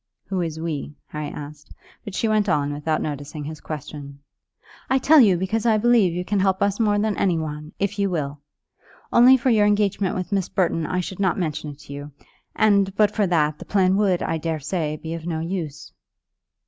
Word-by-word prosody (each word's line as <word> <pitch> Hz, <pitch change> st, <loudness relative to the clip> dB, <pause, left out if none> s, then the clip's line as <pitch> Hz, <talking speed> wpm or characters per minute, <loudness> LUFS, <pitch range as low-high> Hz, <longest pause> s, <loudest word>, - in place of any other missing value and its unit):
"Who 190 Hz, -2 st, -1 dB
is 160 Hz, -2 st, -3 dB
we?" 150 Hz, -3 st, -4 dB
Harry 150 Hz, -1 st, -4 dB
asked; 150 Hz, 0 st, -9 dB, 0.3 s
but 205 Hz, -4 st, -7 dB
she 225 Hz, -, 0 dB
went 215 Hz, -2 st, +2 dB
on 145 Hz, -2 st, +1 dB
without 155 Hz, +2 st, -1 dB
noticing 145 Hz, 0 st, -5 dB
his 155 Hz, +1 st, -7 dB
question. 145 Hz, -2 st, -7 dB, 0.7 s
"I 265 Hz, -, +4 dB
tell 300 Hz, +4 st, +6 dB
you, 200 Hz, -8 st, +6 dB
because 195 Hz, +5 st, -1 dB
I 220 Hz, -2 st, +4 dB
believe 230 Hz, -4 st, +4 dB
you 180 Hz, +2 st, -3 dB
can 205 Hz, +1 st, 0 dB
help 190 Hz, 0 st, +2 dB
us 200 Hz, +1 st, 0 dB
more 210 Hz, -2 st, +2 dB
than 210 Hz, 0 st, 0 dB
any 180 Hz, -4 st, +2 dB
one, 150 Hz, -1 st, -5 dB
if 200 Hz, +1 st, -2 dB
you 200 Hz, -1 st, +2 dB
will. 145 Hz, -5 st, -3 dB, 0.7 s
Only 250 Hz, +2 st, +7 dB
for 255 Hz, +1 st, +1 dB
your 210 Hz, -2 st, +4 dB
engagement 205 Hz, -2 st, +1 dB
with 185 Hz, +2 st, -4 dB
Miss 195 Hz, -3 st, 0 dB
Burton 165 Hz, -4 st, 0 dB
I 180 Hz, -, -1 dB
should 185 Hz, +1 st, -7 dB
not 190 Hz, -3 st, +1 dB
mention 155 Hz, -4 st, -3 dB
it 145 Hz, -1 st, -11 dB
to 140 Hz, -, -10 dB
you; 145 Hz, +1 st, -8 dB, 0.4 s
and, 200 Hz, -2 st, +3 dB
but 210 Hz, 0 st, +4 dB
for 210 Hz, -2 st, +1 dB
that, 155 Hz, -4 st, +1 dB
the -, -, -9 dB
plan 190 Hz, -2 st, +2 dB
would, 195 Hz, -4 st, +2 dB
I 165 Hz, 0 st, -1 dB
daresay, 155 Hz, 0 st, -2 dB
be 160 Hz, +1 st, -6 dB
of 165 Hz, 0 st, -6 dB
no 160 Hz, -2 st, -2 dB
use." 160 Hz, -3 st, -5 dB
180 Hz, 205 wpm, -23 LUFS, 150-205 Hz, 0.7 s, Only